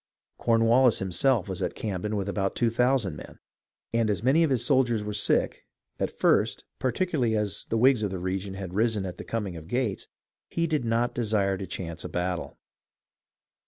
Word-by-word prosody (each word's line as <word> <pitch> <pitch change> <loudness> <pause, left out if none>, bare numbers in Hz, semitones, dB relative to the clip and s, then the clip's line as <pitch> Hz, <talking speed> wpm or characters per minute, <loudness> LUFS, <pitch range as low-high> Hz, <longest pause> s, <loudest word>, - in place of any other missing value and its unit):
Cornwallis 115 +2 +4
himself 100 +3 +1
was 95 -2 -4
at - - -2
Camden 105 0 -3
with 100 -1 -2
about 95 -1 -1
two 115 -1 +2
thousand 125 - +1
men; - - -11 0.6
and 115 -1 +2
as 105 0 -1
many 135 +6 +4
of 160 - +2
his 125 -3 0
soldiers 125 -6 +2
were 105 0 -4
sick, - - +1 0.4
at - - 0
first, - - +1 0.2
particularly 130 -4 0
as 105 -2 -2
the 115 - +1
Whigs 125 0 +4
of 105 - 0
the 95 - -4
region 95 +2 -3
had 95 -2 -6
risen 110 -1 +1
at 90 -1 -7
the - - -5
coming 105 -6 -3
of 80 -1 -9
Gates, 120 -2 -2 0.4
he 170 - 0
did 155 -5 0
not 115 +1 +1
desire 105 -4 +1
to 95 0 -6
chance 85 -2 -5
a - - -5
battle. 90 0 -3
110 Hz, 185 wpm, -27 LUFS, 95-120 Hz, 0.6 s, Cornwallis